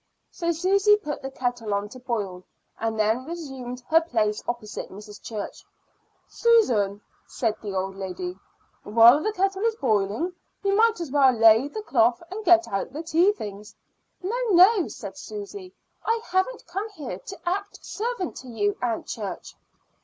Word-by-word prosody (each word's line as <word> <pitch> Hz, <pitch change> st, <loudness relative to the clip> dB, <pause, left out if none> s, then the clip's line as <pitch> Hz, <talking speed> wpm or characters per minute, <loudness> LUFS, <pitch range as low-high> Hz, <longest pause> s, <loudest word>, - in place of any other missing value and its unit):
So 340 Hz, -1 st, -1 dB
Susy 390 Hz, +5 st, +4 dB
put 300 Hz, -8 st, -5 dB
the 270 Hz, -, -5 dB
kettle 245 Hz, -5 st, -2 dB
on 200 Hz, +1 st, -2 dB
to 255 Hz, -, -11 dB
boil, 205 Hz, -8 st, -3 dB, 0.4 s
and 225 Hz, 0 st, -1 dB
then 220 Hz, +4 st, +2 dB
resumed 265 Hz, -6 st, -7 dB
her 325 Hz, +1 st, +6 dB
place 215 Hz, -9 st, 0 dB
opposite 235 Hz, -3 st, -4 dB
Mrs. 205 Hz, +1 st, -11 dB
Church. 215 Hz, -3 st, -6 dB, 0.6 s
"Susan," 235 Hz, -, +3 dB, 0.3 s
said 225 Hz, -4 st, -1 dB
the 205 Hz, -3 st, -5 dB
old 190 Hz, +1 st, -2 dB
lady, 185 Hz, -2 st, -5 dB, 0.5 s
"while 230 Hz, +6 st, +6 dB
the 430 Hz, -, 0 dB
kettle 390 Hz, -1 st, 0 dB
is 455 Hz, 0 st, +1 dB
boiling 220 Hz, -, 0 dB, 0.3 s
you 395 Hz, 0 st, +2 dB
might 450 Hz, 0 st, +4 dB
as 330 Hz, -6 st, -5 dB
well 275 Hz, -2 st, +5 dB
lay 225 Hz, +2 st, +6 dB
the 430 Hz, +8 st, -6 dB
cloth 240 Hz, -, +2 dB
and 430 Hz, +3 st, -5 dB
get 345 Hz, -2 st, +5 dB
out 195 Hz, +5 st, -3 dB
the 305 Hz, +4 st, -6 dB
tea 335 Hz, +5 st, +4 dB
things." 210 Hz, -, -8 dB, 0.5 s
"No, 400 Hz, +6 st, -1 dB
no," 375 Hz, +1 st, +6 dB
said -, -, -8 dB
Susy; 405 Hz, -3 st, -8 dB, 0.3 s
"I 455 Hz, 0 st, +1 dB
haven't 375 Hz, +7 st, -1 dB
come 390 Hz, +6 st, -4 dB
here 265 Hz, -, -6 dB
to 385 Hz, -, -9 dB
act 400 Hz, +3 st, -3 dB
servant 440 Hz, -5 st, -3 dB
to 260 Hz, -, -10 dB
you, 205 Hz, -4 st, 0 dB
Aunt 235 Hz, -2 st, -1 dB
Church." 200 Hz, -5 st, -6 dB
265 Hz, 160 wpm, -25 LUFS, -, 0.6 s, her